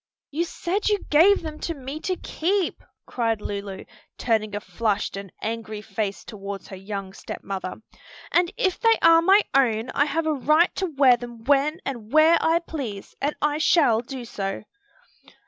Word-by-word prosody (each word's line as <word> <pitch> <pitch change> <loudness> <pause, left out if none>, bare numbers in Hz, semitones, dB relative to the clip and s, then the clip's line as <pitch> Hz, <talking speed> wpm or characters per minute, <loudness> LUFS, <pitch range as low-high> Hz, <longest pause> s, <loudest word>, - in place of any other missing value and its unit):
"You 325 +4 0
said 370 +5 -2
you 415 -1 0
gave 345 +6 +5
them 310 -1 -6
to 335 - -3
me 275 +2 -6
to 370 +3 -2
keep!" 365 +2 -1 0.2
cried 230 -3 -1
Lulu, 200 -2 -6 0.3
turning 215 -3 0
a - - -1
flushed 210 -2 -2
and 195 -2 -7
angry 220 -1 -4
face 200 -1 -3
toward 200 -2 -7
her 190 - -7
young 195 0 -6
step - - -8
mother; 190 -2 -4 0.6
"and 350 0 +3
if 375 -2 0
they 455 -1 +5
are 330 0 +7
my 390 +4 +6
own, 235 -4 +2
I 285 - +2
have 320 +2 -1
a 315 - +1
right 305 +5 +3
to 380 - 0
wear 270 -6 +4
them 240 -1 -10
when 290 +6 +2
and 235 -5 -5
where 310 +2 +6
I 325 +1 +3
please, 270 - -6
and 290 +2 0
I 295 0 +1
shall 285 -9 +4
do 250 0 -7
so." 195 -3 -4
270 Hz, 175 wpm, -24 LUFS, 215-325 Hz, 0.6 s, are